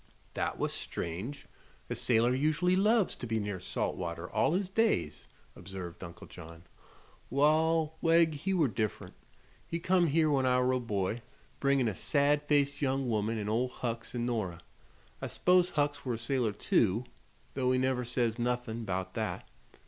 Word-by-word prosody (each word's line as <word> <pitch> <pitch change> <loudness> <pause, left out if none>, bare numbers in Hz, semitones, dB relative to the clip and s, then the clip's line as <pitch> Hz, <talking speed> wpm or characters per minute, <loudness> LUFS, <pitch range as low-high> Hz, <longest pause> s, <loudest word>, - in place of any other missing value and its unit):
"That - - -2
was - - -2
strange. 95 - -5 0.4
A - - -3
sailor 120 +1 +3
usually 155 +7 +2
loves 210 +1 +3
to 120 - -6
be 110 0 0
near 100 -3 -3
salt 90 - -2
water 85 -1 -5
all 135 +8 +2
his 190 +1 0
days," 190 - 0 0.3
observed 90 -1 -8
Uncle 85 -1 -9
John. 85 +1 -12 0.7
"Wall, 155 +3 +2
Wegg 165 -1 +4
he 150 +7 -3
were 170 -6 +3
diff'rent. 110 -2 -3 0.5
He 165 - -2
come 180 0 +3
here 155 +1 +3
when 135 -2 +2
I 125 0 +3
were 125 0 +2
a 130 - +1
boy, 105 -1 -2 0.4
bringin' 140 -3 +2
a 110 - 0
sad 145 - +2
faced 140 -1 +2
young 135 -2 0
woman 110 +1 0
an' 105 -1 -3
Ol' 115 +4 +1
Hucks 115 -1 -5
an' 120 -1 -1
Nora. 100 -8 -2 0.6
I - - -2
s'pose 180 0 +3
Hucks 145 -2 -1
were 125 -3 -1
a - - -5
sailor, 120 -1 0
too, 105 +2 +1 0.5
though 130 -2 +1
he 130 - +3
never 130 -1 +1
says 120 -1 0
nuthin' 120 -1 -2
'bout 95 -1 -3
that. - - -3
125 Hz, 170 wpm, -31 LUFS, 110-150 Hz, 0.7 s, Wegg